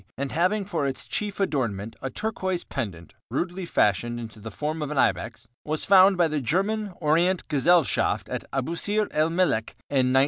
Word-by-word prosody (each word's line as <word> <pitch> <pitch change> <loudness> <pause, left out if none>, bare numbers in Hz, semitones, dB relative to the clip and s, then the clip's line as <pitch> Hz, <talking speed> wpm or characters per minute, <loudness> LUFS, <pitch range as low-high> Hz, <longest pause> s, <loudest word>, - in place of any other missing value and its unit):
and 140 0 -3
having 185 +6 +1
for 165 -7 -1
its 135 - -3
chief 205 -1 -3
adornment 115 - -1
a 135 - -3
turquoise 190 - -2
pendant 95 - -6 0.2
rudely 180 +1 -2
fashioned 120 - +1
into 110 -2 -8
the 110 +2 -7
form 155 +7 -3
of 150 - -2
an 150 - -4
ibex, - - 0 0.2
was 155 0 -1
found 195 0 +6
by 175 -2 +4
the 150 -2 -2
German 200 - 0
Orient 170 +4 +2
Gesellschaft 165 +2 +2
at - - -4
Abusîr 170 +10 0
el 155 +1 +2
Meleq 165 -10 0 0.2
in 130 -3 +3
1905. 130 - +3
155 Hz, 175 wpm, -25 LUFS, 130-185 Hz, 0.2 s, found